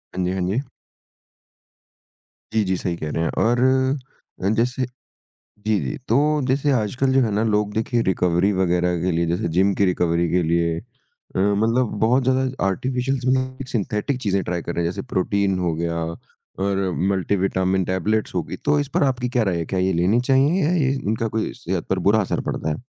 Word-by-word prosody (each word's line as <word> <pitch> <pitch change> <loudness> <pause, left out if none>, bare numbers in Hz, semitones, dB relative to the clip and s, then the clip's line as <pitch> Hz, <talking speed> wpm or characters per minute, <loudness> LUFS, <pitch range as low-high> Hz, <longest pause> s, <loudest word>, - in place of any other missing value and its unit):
हाँ 95 - -1
जी, 90 - 0
हाँ 95 0 -2
जी। 120 +9 -1 1.9
जी, 110 -1 +3
जी, 95 -1 0
सही 90 -1 -2
कह 75 - -4
रहे 80 - -1
हैं - - 0
और 120 +2 +2 0.8
अ, 95 - +2
जैसे 125 +3 0 0.5
जी, 105 0 -3
जी, - - -3
तो 150 +5 +2
जैसे 135 +2 +2
आजकल 130 +2 +1
जो 135 - +4
है 115 -4 +1
ना 105 +2 +1
लोग 105 -2 +1
देखिए, 115 +2 0
रिकवरी 90 -1 +2
वगैरह 90 -1 +1
के 90 +2 +1
लिए 85 0 +1
जैसे 90 +7 -1
जिम 100 +2 +4
की 100 - +3
रिकवरी 85 -2 +1
के 90 - +3
लिए 85 0 +1
अ, 120 0 -15
मतलब 110 +5 +2
बहुत 125 +4 +3
ज़्यादा 130 +1 +2 0.2
आर्टिफ़िशल्स 125 +6 -1
भी 130 - +3
नहीं 130 0 -2
सिंथेटिक 110 +4 -1
चीज़ें 100 -3 +1
ट्राई 90 -1 -2
कर 85 - -5
रहे 85 - 0
हैं 85 - 0
जैसे - - -5
प्रोटीन 95 0 +1
हो 90 -2 0
गया 85 +1 -2 0.6
और 95 -1 0 0.2
मल्टी 95 +1 0
विटामिन 95 -1 +1
टैबलेट्स 100 +5 -1
हो - - +1
गई, - - -6
तो 145 - +1
इस 145 - -1
पर - - +3
आपकी 125 -3 0
क्या 120 -1 +1
राय 95 -4 0
है? 85 - -2
क्या 95 - -2
ये 95 +1 +1
लेनी 90 +7 +2
चाहिए 140 +8 +3
या 155 - +2
ये 140 -6 +2
इनका 115 -3 -1
कोई 110 - -1
सेहत 95 -7 -3
पर 95 - +1
बुरा 110 +1 +4
असर 95 - -1
पड़ता - - -2
है? 75 - -3
105 Hz, 200 wpm, -22 LUFS, 90-125 Hz, 1.9 s, जो